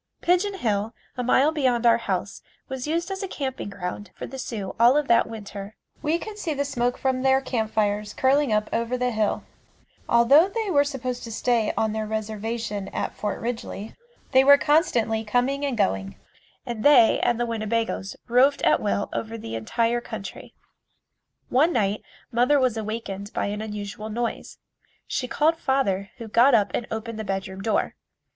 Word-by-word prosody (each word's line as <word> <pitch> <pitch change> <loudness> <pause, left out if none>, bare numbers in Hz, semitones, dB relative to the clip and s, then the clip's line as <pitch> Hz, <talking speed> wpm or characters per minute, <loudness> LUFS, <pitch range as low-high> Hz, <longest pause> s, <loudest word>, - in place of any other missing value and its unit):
Pigeon 365 +3 +1
Hill, 220 - -1 0.2
a 250 - -2
mile 260 +4 +3
beyond 255 -6 +1
our 235 0 +5
house 195 -2 -3 0.3
was 265 +1 -5
used 335 +4 -1
as 385 - -4
a 390 - -3
camping 265 - -4
ground 195 +1 -6
for - - -6
the 265 +1 -8
Sioux 210 -6 -5
all 240 +4 +6
of 295 -2 0
that 235 0 +4
winter. 210 -2 -8 0.3
We 310 +2 +1
could 420 +4 -8
see 325 -7 -2
the 285 +1 -1
smoke 245 -3 -1
from 260 -1 0
their 265 0 +4
campfires 215 -4 -1
curling 275 0 +3
up 210 0 +1
over 235 +2 0
the 250 0 0
hill, 215 -2 0 0.7
although 275 +10 +6
they 430 -1 -2
were 285 -3 +5
supposed 255 -3 -4
to 230 - -7
stay 230 -1 +1
on 220 -1 +1
their 215 0 -3
reservation 220 -1 -3
at - - -3
Fort 210 - -3
Ridgely 225 -3 -5 0.4
they 260 -1 +6
were 285 +1 +8
constantly 245 -8 +2
coming 250 +6 0
and 275 -4 -1
going 95 - 0 0.5
and 230 -2 -4
they 255 -6 +6
and 240 -1 +1
the 240 - +1
Winnebagoes 225 -3 -2
roved 255 +4 +3
at - - +4
will 205 -1 0
over 225 0 -4
the 115 - -7
entire 230 - 0
country. 195 - -8 0.9
One 300 +7 +4
night 205 -2 0 0.3
mother 250 +5 +3
was 255 -3 +2
awakened 215 -2 -5
by - - -1
an 210 +1 -4
unusual 210 0 -6
noise. 235 +2 -4 0.5
She 250 - -2
called 315 +5 +2
father, 200 -10 0
who 230 - -7
got 240 +4 +5
up 210 -3 +2
and 240 - -2
opened 220 0 -5
the - - -3
bedroom 195 -1 -4
door. 220 +2 0
235 Hz, 175 wpm, -25 LUFS, 215-265 Hz, 0.9 s, were